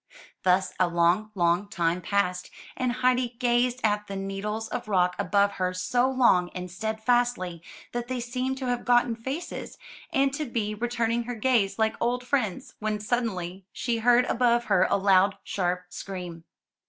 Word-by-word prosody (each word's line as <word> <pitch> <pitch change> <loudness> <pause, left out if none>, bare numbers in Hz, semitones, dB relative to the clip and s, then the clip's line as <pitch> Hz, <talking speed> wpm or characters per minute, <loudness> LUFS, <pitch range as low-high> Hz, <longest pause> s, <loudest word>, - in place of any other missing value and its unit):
Thus 185 0 +2
a 180 - +4
long, 175 +5 +2
long 175 +2 +2
time 170 -1 0
passed; 180 -1 -1 0.3
and 255 -1 0
Heidi 250 0 +1
gazed 245 0 +1
at 210 -1 +1
the 195 - -5
needles 195 +3 -3
of - - -4
rock 180 -3 +2
above 200 +1 +2
her 185 0 0
so 245 +7 +1
long 235 -9 +3
and 180 -1 -5
steadfastly 220 -3 0 0.3
that 240 0 -3
they 255 0 -3
seemed 255 +2 -2
to 265 - -4
have 245 -1 -1
gotten 240 -1 +3
faces, 265 +9 -6 0.3
and 270 0 +2
to 300 +1 -2
be 220 -4 -2
re 235 +3 -3
turning 235 0 0
her 245 0 -4
gaze 225 -4 +1
like 220 0 +1
old 245 +1 0
friends, 255 -1 -1
when 215 -1 -1
suddenly 200 -5 -2
she 235 -2 -2
heard 245 +2 +4
above 240 -1 +2
her 195 -5 +3
a - - +3
loud, 195 0 +4
sharp 180 -1 -1
scream. 180 -3 -7
220 Hz, 165 wpm, -27 LUFS, 185-245 Hz, 0.3 s, a